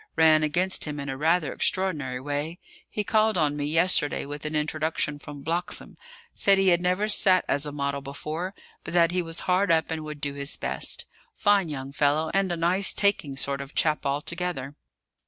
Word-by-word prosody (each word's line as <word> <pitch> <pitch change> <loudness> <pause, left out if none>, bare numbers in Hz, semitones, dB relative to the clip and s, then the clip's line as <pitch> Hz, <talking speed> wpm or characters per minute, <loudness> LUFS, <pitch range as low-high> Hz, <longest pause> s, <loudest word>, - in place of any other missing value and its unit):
Ran 155 -1 +5
against 175 +5 +1
him 150 -1 -5
in 140 0 -5
a 135 - -3
rather 160 +2 +1
extraordinary 150 -10 -1
way. 145 +5 -3 0.3
He 210 - -3
called 215 0 +2
on 150 -3 +1
me 145 -1 -3
yesterday 160 -1 +2
with 145 +1 -6
an 155 - -4
introduction 150 -1 -1
from 145 -1 -10
Bloxham: 170 +4 -3 0.4
said 195 -1 +4
he 195 -1 +3
had 175 -1 +3
never 185 +4 +1
sat 190 -3 +4
as 145 +1 +2
model 140 -1 -3
before; 155 +7 -5 0.3
but - - -6
that 170 -1 +4
he 180 0 0
was 165 -1 -3
hard 185 0 +2
up, 160 0 +2
and 160 -1 -3
would 150 -1 -7
do 145 -1 -2
his 140 +1 -2
best. - - -3 0.3
Fine 200 -4 +2
young 135 -2 -6
fellow, 145 +3 +1
and 195 -2 +1
a 175 - -2
nice 180 +4 +2
taking 160 -9 +1
sort 140 0 0
of 140 +1 -10
chap 155 -1 +2
altogether." 145 0 -3
155 Hz, 190 wpm, -26 LUFS, 145-180 Hz, 0.4 s, Ran